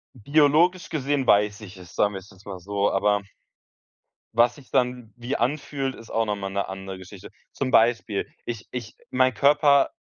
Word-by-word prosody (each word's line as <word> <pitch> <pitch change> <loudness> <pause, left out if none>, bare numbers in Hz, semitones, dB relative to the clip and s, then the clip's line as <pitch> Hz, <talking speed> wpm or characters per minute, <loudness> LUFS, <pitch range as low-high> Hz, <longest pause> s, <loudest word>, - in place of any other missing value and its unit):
Biologisch 155 - +3
gesehen 140 -2 -1
weiß 105 +1 +3
ich 100 -1 -11
es, 90 -1 -13
sagen 105 0 +2
wir's 95 +1 -9
jetzt 95 0 -19
mal 95 - -6
so, 100 +2 -1
aber 100 +1 +2 1.1
was 120 +1 +4
sich 140 -4 -17
dann 125 -3 0
wie 120 +3 -3
anfühlt, 135 +1 -2
ist 115 - -13
auch 115 0 +1
noch 105 -1 -1
mal 95 -1 -5
'ne 100 0 -2
andere 95 0 -7
Geschichte. 95 +1 -11 0.2
Zum 130 -2 -3
Beispiel, 115 -4 +2 0.2
ich 115 -1 -6
ich 120 -4 -6
mein 130 0 +2
Körper 140 0 +4
115 Hz, 175 wpm, -24 LUFS, 100-135 Hz, 1.1 s, was